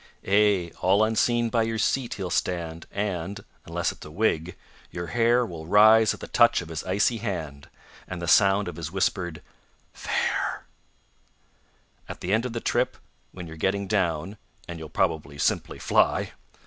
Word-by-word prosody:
Ay, 100 -4 +3
all 100 +3 +4
unseen 115 +1 +1
by 115 - +2
your 115 0 -1
seat 120 +2 0
he'll 95 -3 -5
stand, 85 -2 -2
And 100 -1 -4 0.2
(unless - - -1
it's - - -13
a - - -10
wig) 85 -1 -1 0.3
your 85 0 -5
hair 120 +3 +2
Will 80 -6 -8
rise 110 +3 +6
at - - -7
the - - -7
touch - - +4
of 85 - -8
his 80 -2 -5
icy 100 +5 +1
hand, 80 -10 -5 0.4
And 90 - -6
the 85 - -5
sound 100 +2 +4
of 85 -2 -6
his 80 -1 -5
whispered 90 -3 -1 0.5
"Fare!" - - -2 1.4
At - - -8
the 95 - -1
end 115 +3 +1
of 120 - -8
the 115 - -2
trip, - - 0 0.3
when 90 -2 -8
you're 80 -1 -10
getting 100 +4 0
down 95 -1 -1 0.3
(And 85 -1 -7
you'll 80 -1 -8
probably 80 -6 -1
simply - - -1
fly!) - - +2
95 Hz, 165 wpm, -26 LUFS, 85-110 Hz, 1.4 s, rise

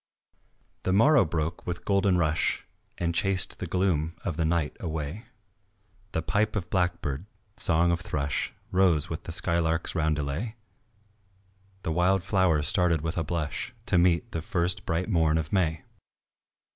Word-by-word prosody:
The 95 - 0
morrow 130 +3 +5
broke 80 +1 -3
with 85 -1 -4
golden 100 -2 +3
rush 80 -2 0 0.3
And 85 -1 -1
chased 95 +2 +1
the 90 - -4
gloom 85 -2 0
of 90 -6 -2
night 80 -2 0
away; 80 - -4 0.9
The 80 - -1
pipe 105 +4 0
of 90 -4 -3
blackbird, 90 -3 -1 0.3
song 85 +1 +2
of 85 0 0
thrush, 70 -5 -2 0.2
Rose 90 -6 +3
with 80 - -5
the - - -5
skylark's 85 -1 +1
roundelay, 80 +6 -1 1.3
The 80 - -1
wild 90 +3 +2
flowers 90 -7 +2
started 90 -3 +3
with 80 +1 -3
a 80 - 0
blush 80 -2 -3
To 90 - +3
meet 90 +6 +2
the 80 - -3
first 85 +1 -1
bright 85 +4 0
morn 80 -6 +2
of 80 +2 -3
May. 80 -5 +1
85 Hz, 145 wpm, -27 LUFS, 80-95 Hz, 1.3 s, morrow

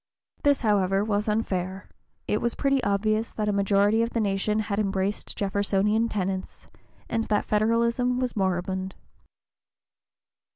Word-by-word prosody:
This, 285 -1 +3
however, 195 -3 +2
was 210 0 0
unfair; 190 -3 -2 0.4
it 210 - 0
was 235 - -1
perfectly 275 -2 +1
obvious 215 +3 0
that 210 -1 -2
a 210 - +1
majority 200 +2 +3
of 230 - +1
the 235 - -2
nation 205 0 0
had 205 -1 -2
embraced 195 0 -2
Jeffersonian 205 +3 +1
tenets, 190 -2 -3 0.4
and 225 -1 -1
that 210 -1 0
Federalism 235 +3 +1
was 255 -2 -2
moribund. 190 -1 -1
210 Hz, 130 wpm, -26 LUFS, 195-225 Hz, 0.4 s, This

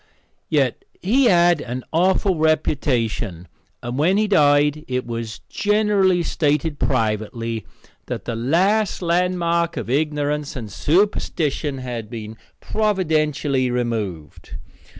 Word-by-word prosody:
Yet 140 -6 +1 0.2
he 250 +8 +3
had 175 -6 +4
an 125 0 -5
awful 185 +3 +2
reputation, 125 - 0 0.4
and 120 +3 -4
when 180 +6 +3
he 215 0 +2
died 150 -4 +3
it 125 0 -2
was 115 -2 -5
generally 205 -4 +2
stated 150 -1 0
privately 115 -1 -1 0.4
that - - -5
the 115 - -3
last 185 - +1
landmark 170 -1 +1
of - - -4
ignorance 150 0 -1
and 110 -6 -6
superstition 150 - 0
had 120 -4 -5
been 110 -2 -7 0.3
providentially 155 -10 0
removed. 110 -10 -4
150 Hz, 110 wpm, -21 LUFS, 120-175 Hz, 0.4 s, had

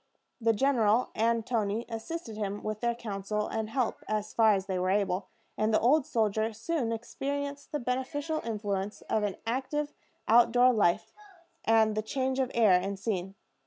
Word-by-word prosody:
The 225 0 +4
general 230 -1 +2
and 230 0 +1
Toni 220 -1 -1
assisted 230 +2 -6
him 205 -1 -3
with 215 0 -3
their 235 0 0
counsel 210 -2 -3
and 220 -1 -3
help 250 -1 -1
as 215 0 -2
far 220 -2 +5
as 190 -1 -2
they 190 -2 -2
were 185 +1 0
able; 195 -1 0 0.3
and 215 +1 +2
the 215 - +4
old 270 +4 +3
soldier 220 0 0
soon 230 +2 -2
experienced 280 +5 -4
the 300 - 0
beneficial 265 +5 -2
influence 205 -3 -3
of 215 - -1
an 205 -2 -1
active 270 +5 -2 0.3
out 235 +1 +6
door 250 +1 +5
life 200 -6 +1 0.5
and 220 -1 +4
the 215 - 0
change 260 +4 -1
of 260 -1 +1
air 225 -4 +5
and 195 +2 +1
scene. 195 -2 -3
225 Hz, 170 wpm, -29 LUFS, 210-250 Hz, 0.5 s, out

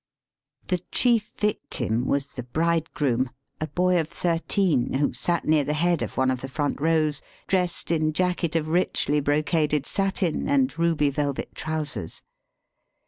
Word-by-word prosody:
The 180 -2 0
chief 230 -4 +3
victim 125 - -1
was 140 0 0
the 125 - -6
bridegroom, 145 -2 0 0.3
a 155 - -2
boy 180 +1 +2
of 160 - -1
thirteen, 170 - +1
who 140 +2 +1
sat 170 -1 -1
near 155 -1 +3
the 150 +2 -1
head 170 +1 +2
of - - -4
one 130 0 +3
of 130 -1 -3
the 135 - -6
front 145 0 -2
rows, 155 -2 +2 0.2
dressed 180 -3 -1
in 155 -2 +2
jacket 175 -1 0
of 160 -2 +1
richly 155 -3 +1
brocaded 150 0 +1
satin 195 - -1
and 270 -2 +2
ruby 160 -4 +2
velvet 140 -1 -2
trousers. 155 - -4
155 Hz, 145 wpm, -25 LUFS, 145-175 Hz, 0.3 s, chief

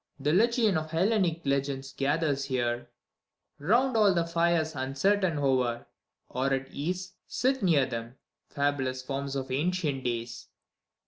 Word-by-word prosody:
The 145 +3 +1
legion 225 -1 +3
of 155 0 -7
Hellenic 175 -1 +1
legends 135 -1 -1
gathers 140 0 0
here, 120 -2 -1 0.7
"^ound 240 - +3
all 205 -4 +5
the 170 - +2
flres 170 -1 +1
uncertain 160 +7 +1
hover, 130 -4 +1 0.4
or 130 +2 -1
at 135 0 -1
ease 180 +5 -4 0.2
t 255 +4 +2
near 160 -8 +4
them, 115 -1 -6 0.3
fabulous 135 -3 -1
forms 140 +1 -4
of 135 -1 -3
ancient 150 -1 -1
days. 120 0 -4
145 Hz, 130 wpm, -28 LUFS, 130-175 Hz, 0.7 s, all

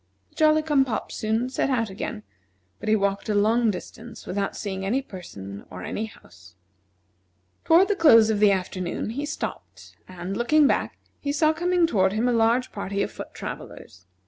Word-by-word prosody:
The - - -30
Jolly 310 0 +4
cum 295 -3 +3
pop 245 -4 -4
soon 220 +3 -1
set 270 - 0
out 230 -6 0
again, 105 - -5 0.6
but 215 - -4
he 215 - +5
walked 200 0 -1
a 210 - +1
long 225 +3 +3
distance 220 +4 -7
without 195 +1 -2
seeing 190 -2 -4
any 245 +8 0
person 100 - -9
or 90 0 -8
any 220 - -3
house. 90 - -18 1.1
Toward 345 +4 +6
the 410 - +1
close 230 - +6
of 210 - 0
the 210 -1 +6
afternoon 185 +1 -2
he 285 +5 -4
stopped, 305 - -7
and, 185 +1 -6
looking 295 +7 +4
back, - - 0 0.2
he 285 - -2
saw 310 +2 +3
coming 350 +1 +2
toward 190 - +2
him 225 +3 +1
a 245 - +2
large 230 +2 +2
party 200 0 -2
of - - -4
foot - - -9
travellers. 90 0 -9
220 Hz, 180 wpm, -25 LUFS, 190-275 Hz, 1.1 s, Toward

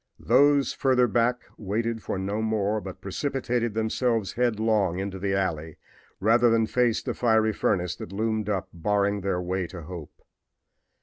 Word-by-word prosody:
Those 145 -1 +4
further 130 -3 +3
back 120 +2 +1 0.2
waited 115 +3 -2
for - - -3
no 100 +3 -2
more, 110 -1 0
but 95 -2 -9
precipitated 120 +1 -2
themselves 110 -1 0
headlong 110 -6 +1
into 95 0 -4
the 95 0 -1
alley 80 -5 -2 0.4
rather 115 +4 +4
than 115 -1 +3
face 120 0 +1
the - - -2
fiery 110 -2 +2
furnace 90 -5 0
that - - -8
loomed 110 +1 -1
up 95 -3 -1
barring 100 +3 0
the 95 -1 -1
way 90 0 -2
to 85 0 -9
hope. 85 -1 -10
110 Hz, 150 wpm, -26 LUFS, 95-115 Hz, 0.4 s, Those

